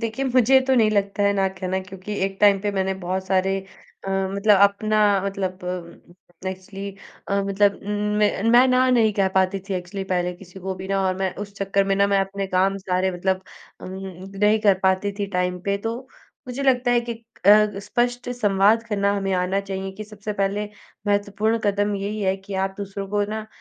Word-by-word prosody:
देखिए 230 Hz, +4 st, -2 dB
मुझे 260 Hz, +1 st, +4 dB
तो 265 Hz, -, +3 dB
नहीं 220 Hz, -3 st, +4 dB
लगता 200 Hz, -1 st, 0 dB
है, 200 Hz, 0 st, +4 dB
ना 195 Hz, -1 st, +1 dB
कहना 190 Hz, 0 st, -3 dB
क्योंकि 190 Hz, +2 st, -8 dB
एक 195 Hz, 0 st, -3 dB
टाइम 200 Hz, -2 st, +5 dB
पे 205 Hz, +1 st, -1 dB
मैंने 190 Hz, -1 st, 0 dB
बहुत 185 Hz, +1 st, -2 dB
सारे 190 Hz, 0 st, +1 dB, 0.5 s
अ, -, -, -2 dB, 0.2 s
मतलब 200 Hz, 0 st, +4 dB
अपना 215 Hz, +2 st, +3 dB, 0.3 s
मतलब 190 Hz, -2 st, -3 dB
अम, 180 Hz, +1 st, -8 dB
एक्चुअली 195 Hz, +1 st, -7 dB, 0.4 s
अ, 200 Hz, 0 st, +1 dB
मतलब 200 Hz, 0 st, +2 dB
उम, 205 Hz, -, -6 dB, 0.3 s
मैं 205 Hz, -2 st, +2 dB
मैं 245 Hz, +2 st, +7 dB
ना 255 Hz, 0 st, +3 dB
नहीं 225 Hz, -4 st, +4 dB
कह 195 Hz, -1 st, +2 dB
पाती 190 Hz, +1 st, +1 dB
थी 195 Hz, -, -1 dB
एक्चुअली 185 Hz, +2 st, -4 dB
पहले 180 Hz, -1 st, 0 dB
किसी 180 Hz, +1 st, -13 dB
को 190 Hz, +1 st, -3 dB
भी 190 Hz, +1 st, -8 dB
ना 195 Hz, 0 st, +1 dB
और 185 Hz, -, 0 dB
मैं 190 Hz, -1 st, -1 dB
उस 200 Hz, -, -16 dB
चक्कर 195 Hz, 0 st, +1 dB
में 195 Hz, 0 st, +1 dB
ना 200 Hz, 0 st, +4 dB
मैं 200 Hz, -1 st, +2 dB
अपने 195 Hz, 0 st, -3 dB
काम 190 Hz, +1 st, +1 dB
सारे 185 Hz, 0 st, 0 dB
मतलब 190 Hz, +1 st, -1 dB, 0.4 s
अम, -, -, -8 dB, 0.5 s
नहीं 210 Hz, +2 st, +4 dB
कर 200 Hz, -3 st, +4 dB
पाती 190 Hz, +1 st, +2 dB
थी 200 Hz, -, -1 dB
टाइम 180 Hz, 0 st, 0 dB
पे। 200 Hz, +1 st, 0 dB
तो 225 Hz, +3 st, -3 dB, 0.5 s
मुझे 250 Hz, +3 st, -4 dB
लगता 250 Hz, -2 st, +2 dB
है 240 Hz, 0 st, +4 dB
कि 235 Hz, 0 st, -4 dB, 0.3 s
अ, 210 Hz, 0 st, +6 dB
स्पष्ट 245 Hz, +4 st, -1 dB
संवाद 210 Hz, -1 st, +3 dB
करना 200 Hz, -2 st, +1 dB
हमें 195 Hz, -1 st, -1 dB
आना 180 Hz, +2 st, 0 dB
चाहिए, 195 Hz, -1 st, -5 dB
कि 215 Hz, +2 st, -8 dB
सबसे 210 Hz, 0 st, -6 dB
पहले 200 Hz, +1 st, -1 dB, 0.4 s
महत्वपूर्ण 205 Hz, +2 st, +1 dB
कदम 205 Hz, 0 st, +1 dB
यही 205 Hz, +2 st, -4 dB
है 190 Hz, -1 st, +1 dB
कि 195 Hz, +1 st, -9 dB
आप 190 Hz, 0 st, -1 dB
दूसरों 200 Hz, -1 st, -5 dB
को 205 Hz, +1 st, 0 dB
ना, 220 Hz, 0 st, -4 dB
200 Hz, 200 wpm, -23 LUFS, 190-210 Hz, 0.5 s, मैं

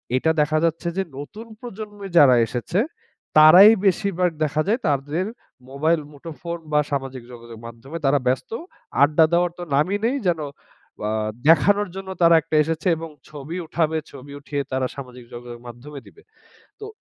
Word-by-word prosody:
এইটা 160 Hz, +5 st, +2 dB
দেখা 155 Hz, +1 st, +1 dB
যাচ্ছে 165 Hz, +1 st, -2 dB
যে, 195 Hz, -, +1 dB
নতুন 210 Hz, +11 st, -9 dB
প্রজন্মে 210 Hz, -4 st, -8 dB
যারা 130 Hz, -5 st, +7 dB
এসেছে 130 Hz, -, -2 dB, 0.6 s
তারাই 175 Hz, +8 st, +9 dB
বেশিরভাগ 185 Hz, -2 st, +1 dB
দেখা 155 Hz, 0 st, 0 dB
যায় 225 Hz, +4 st, +1 dB
তাদের 145 Hz, +5 st, -1 dB, 0.4 s
মোবাইল-মুঠো 150 Hz, +2 st, -2 dB
ফোন 170 Hz, 0 st, -5 dB
বা 150 Hz, -, +4 dB
সামাজিক 135 Hz, -3 st, -4 dB
যোগাযোগ 120 Hz, -1 st, -11 dB
মাধ্যমে 125 Hz, +7 st, -9 dB
তারা 140 Hz, +1 st, +3 dB
ব্যস্ত। 130 Hz, 0 st, -1 dB, 0.5 s
আড্ডা 150 Hz, +3 st, +5 dB
দেওয়ার 175 Hz, 0 st, +2 dB
তো -, -, -4 dB
নামই 170 Hz, +8 st, +1 dB
নেই। 245 Hz, +4 st, +1 dB
যেন 170 Hz, -2 st, +1 dB, 0.7 s
আ -, -, -1 dB, 0.4 s
দেখানোর 200 Hz, +6 st, +4 dB
জন্য 190 Hz, 0 st, -7 dB
তারা 170 Hz, -1 st, +6 dB
একটা 160 Hz, 0 st, -4 dB
এসেছে 160 Hz, +2 st, -3 dB
এবং 165 Hz, 0 st, -7 dB, 0.2 s
ছবি 150 Hz, +3 st, -7 dB
উঠাবে, 160 Hz, 0 st, -1 dB
ছবি 140 Hz, +1 st, -11 dB
উঠিয়ে 145 Hz, 0 st, -4 dB
তারা 130 Hz, 0 st, 0 dB
সামাজিক 125 Hz, -3 st, -10 dB
যোগাযোগ 120 Hz, 0 st, -9 dB
মাধ্যমে 140 Hz, +5 st, -10 dB
দিবে। 420 Hz, -, -18 dB, 0.6 s
তো 420 Hz, -, -7 dB
155 Hz, 155 wpm, -22 LUFS, 140-175 Hz, 0.7 s, তারাই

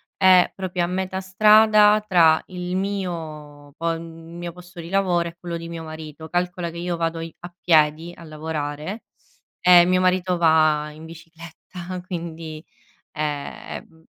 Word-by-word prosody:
è 185 Hz, -2 st, +5 dB
proprio 185 Hz, -2 st, -3 dB
a -, -, -4 dB
metà 190 Hz, +1 st, -3 dB
strada 210 Hz, +2 st, +5 dB
tra 165 Hz, -4 st, +5 dB
il 180 Hz, 0 st, -4 dB
mio 160 Hz, -7 st, -5 dB
po 165 Hz, 0 st, -1 dB
il 165 Hz, 0 st, -4 dB
mio 165 Hz, +1 st, -9 dB
posto 180 Hz, 0 st, -13 dB
di 165 Hz, -, -7 dB
lavoro 180 Hz, -3 st, +1 dB
e 170 Hz, -, -9 dB
quello 170 Hz, -1 st, -5 dB
di 165 Hz, 0 st, -8 dB
mio 165 Hz, -1 st, -7 dB
marito, 160 Hz, 0 st, -9 dB
calcola 175 Hz, -1 st, -2 dB
che 170 Hz, -, -10 dB
io 175 Hz, 0 st, -2 dB
vado 165 Hz, 0 st, -2 dB
i 165 Hz, 0 st, -7 dB
a 175 Hz, 0 st, -9 dB
piedi 160 Hz, 0 st, +2 dB
a 170 Hz, -, -13 dB
lavorare, 155 Hz, +4 st, -5 dB, 0.6 s
e 180 Hz, -1 st, +7 dB
mio 185 Hz, +1 st, +2 dB
marito 185 Hz, 0 st, +1 dB
va 155 Hz, -2 st, +3 dB
in 155 Hz, +1 st, -13 dB
bicicletta, 170 Hz, +2 st, -10 dB
quindi, 165 Hz, -3 st, -6 dB, 0.5 s
ehm, 150 Hz, +2 st, -6 dB
170 Hz, 150 wpm, -22 LUFS, 160-180 Hz, 0.6 s, e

